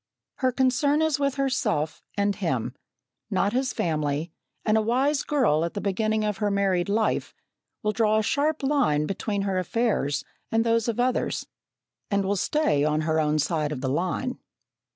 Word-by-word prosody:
Her 260 -1 +1
concern 260 +3 +2
is 315 -3 +1
with 280 -1 0
herself 255 - -1 0.2
and 200 0 +1
him, 135 - -2 0.6
not 200 +2 +1
his 260 0 0
family, 155 0 -1 0.3
and 215 - +3
a 220 - +4
wise 265 +6 +1
girl, 230 - +2
at 170 - -3
the - - -1
beginning 215 +2 0
of 210 -2 -1
her 210 -1 0
married 195 -2 +1
life, 215 +1 0 0.5
will 210 - +2
draw 215 0 +2
a 220 - +2
sharp 295 +6 0
line 260 - +2
between 200 +2 -2
her 195 -2 0
affairs 180 - 0 0.3
and 225 0 +3
those 230 -1 +1
of 235 0 -1
others, 250 +1 0 0.6
and 200 -1 +1
will 200 +1 +1
stay 250 - +1
on 150 +1 +1
her 160 0 +1
own 155 0 +2
side 155 0 0
of 140 -4 -4
the 130 - -1
line. 185 - -1
210 Hz, 175 wpm, -26 LUFS, 165-250 Hz, 0.6 s, a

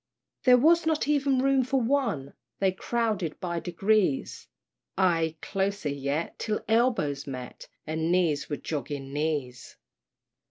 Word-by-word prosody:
There 250 -1 +8
was 325 +5 +4
not 315 -2 +1
even 280 -3 +2
room 270 -1 +3
for 265 +2 +1
one! 230 - 0 0.2
They 195 -1 +2
crowded 210 -4 -2
by 170 -2 -2
degrees 185 -2 0 0.5
Ay 165 -4 +2
closer 195 -4 -1
yet, 140 +3 -3
till 215 -1 -2
elbows 220 - +1
met, 130 -2 -7 0.2
And 160 +2 -1
knees 170 -5 +1
were 145 - -2
jogging 140 -1 -5
knees. 145 -5 -3
180 Hz, 125 wpm, -27 LUFS, 150-240 Hz, 0.5 s, There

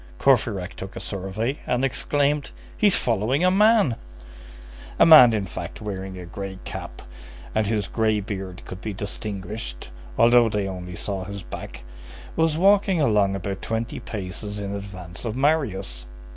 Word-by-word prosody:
Courfeyrac 110 -9 +2
took 95 0 -8
a - - -5
survey, 100 +8 -3
and 125 +2 +1
exclaimed:— 145 +2 0 0.3
"He's 205 -3 +3
following 120 - +1
a 185 - +5
man!" 210 - +4 1.0
A - - +7
man, 155 -8 +10
in 105 -3 -1
fact, 90 - -7
wearing 95 -2 -5
a 90 - -7
gray 95 +2 -6
cap, - - -7 0.5
and 110 -1 +1
whose 105 -2 0
gray 110 +1 +1
beard 95 -3 -6
could 95 0 -8
be 110 - -4
distinguished, 100 - -6 0.3
although 120 0 +6
they 105 -2 -1
only 90 -2 -6
saw 95 +1 -3
his 100 0 -7
back, - - -8 0.5
was 160 -1 +2
walking 195 0 +4
along 105 -8 +3
about 95 0 -4
twenty 115 0 -3
paces 105 -2 -6
in 100 -1 -4
advance 95 -4 -7
of 115 -2 -3
Marius. 105 - 0
105 Hz, 150 wpm, -24 LUFS, 95-125 Hz, 1.0 s, man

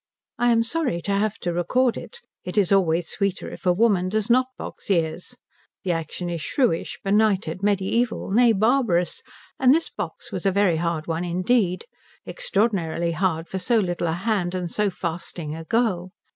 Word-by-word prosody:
I 240 0 +4
am 230 0 +4
sorry 255 - -1
to 200 - -2
have 205 +1 0
to 175 - -1
record 235 +9 +1
it. - - -9 0.2
It 180 +3 -6
is 200 -3 +3
always 175 -3 +3
sweeter 200 -5 -2
if - - -7
a - - +6
woman 190 -2 +2
does 215 +3 0
not 255 +1 +4
box - - -9
ears. 170 +5 -1 0.5
The 185 - 0
action 165 +1 -3
is 170 -2 -3
shrewish, 240 - 0
benighted, 195 -4 +2
mediæval, 205 +4 0
nay, 235 +3 +5
barbarous; 220 -5 +1 0.4
and 265 +1 +6
this 330 - -1
box 185 -6 -6
was 185 - -4
a - - +4
very 190 -4 +2
hard 165 -1 -1
one 165 +1 -2
indeed, 185 +2 +1 0.4
extraordinarily 195 - 0
hard 165 -1 -1
for 190 - -4
so 235 +5 +2
little 175 -4 0
a 160 - 0
hand 185 -1 -1
and 180 -2 -3
so 210 -1 +1
fasting 170 -3 -5
a 165 0 -8
girl. 190 -5 0
190 Hz, 175 wpm, -24 LUFS, 175-220 Hz, 0.5 s, a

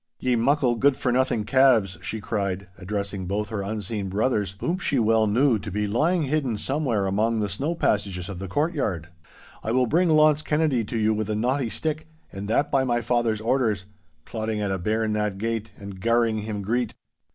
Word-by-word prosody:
'Ye 125 -1 +1
muckle, 130 +1 +2
good 135 +3 +3
for 125 - 0
nothing 125 -3 +1
calves!' 115 -8 +3
she 100 +5 -4
cried, 100 -2 -3
addressing 100 -1 -4
both 105 +2 -2
her 110 -2 -3
unseen 105 0 -3
brothers, 105 -2 0
whom 175 +8 -1
she 145 -7 0
well 110 -1 +3
knew 120 +2 +3
to 105 +2 -6
be 105 +2 -1
lying 155 - +1
hidden 135 -5 0
somewhere 130 -5 0
among 110 +4 +1
the 105 - 0
snow 135 - -2
passages 100 - 0
of 100 -3 -6
the 95 - -5
courtyard, 120 - -1 0.5
'I 110 - -1
will 130 0 +3
bring 170 +8 +2
Launce 155 -1 +5
Kennedy 150 -6 +1
to 115 - -4
you 110 0 +2
with 110 -1 -2
a 105 - 0
knotty 125 +3 0
stick, 155 +5 -3 0.2
and 100 +1 -6
that 140 +7 +1
by 135 -1 +3
my 120 -2 +1
father's 115 -2 0
orders—clodding 110 -1 -2
at 100 -2 -1
a 95 - -1
bairn 110 +3 0
that 105 -2 -1
gate, 115 +1 -2
and 100 -2 -9
garring 115 0 +2
him 105 -1 -4
greet. 120 +3 -1
110 Hz, 190 wpm, -25 LUFS, 100-130 Hz, 0.5 s, Launce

